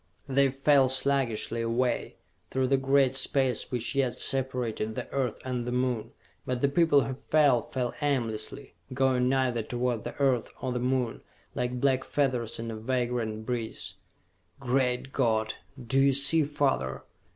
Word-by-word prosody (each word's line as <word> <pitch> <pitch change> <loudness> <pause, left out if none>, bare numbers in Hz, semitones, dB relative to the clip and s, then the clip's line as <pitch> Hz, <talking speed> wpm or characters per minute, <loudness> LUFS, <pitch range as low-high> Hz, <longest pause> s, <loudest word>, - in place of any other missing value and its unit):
They 135 0 +3
fell 135 0 +3
sluggishly 130 -4 0
away, 120 +2 -1 0.3
through 130 -1 0
the 135 - +4
great 135 0 +3
space 135 -2 +1
which 120 0 -2
yet 135 -3 +1
separated 125 -5 -1
the - - -4
Earth 130 -5 -1
and 125 -2 -2
the 125 - -4
Moon. 125 -3 -1 0.3
But 125 -1 -3
the 140 - +3
people 145 -1 +4
who 130 - -3
fell, 140 -2 +3
fell 125 0 -3
aimlessly, 130 -2 -2 0.2
going 130 -1 +2
neither 130 -3 +1
toward 120 0 -2
the - - -6
Earth 130 -5 +1
or 130 - -3
the 125 - -1
Moon, 125 -1 -1 0.3
like 125 0 -2
black 130 0 +2
feathers 125 -6 -1
in 115 0 -5
a - - -5
vagrant 115 -2 -2
breeze. 115 -7 -4 0.7
"Great 130 0 0
God, 110 -1 +1 0.3
do 135 +3 +2
you 135 0 +4
see 145 +3 +3
father?" 135 - -1
125 Hz, 150 wpm, -28 LUFS, 120-135 Hz, 0.7 s, the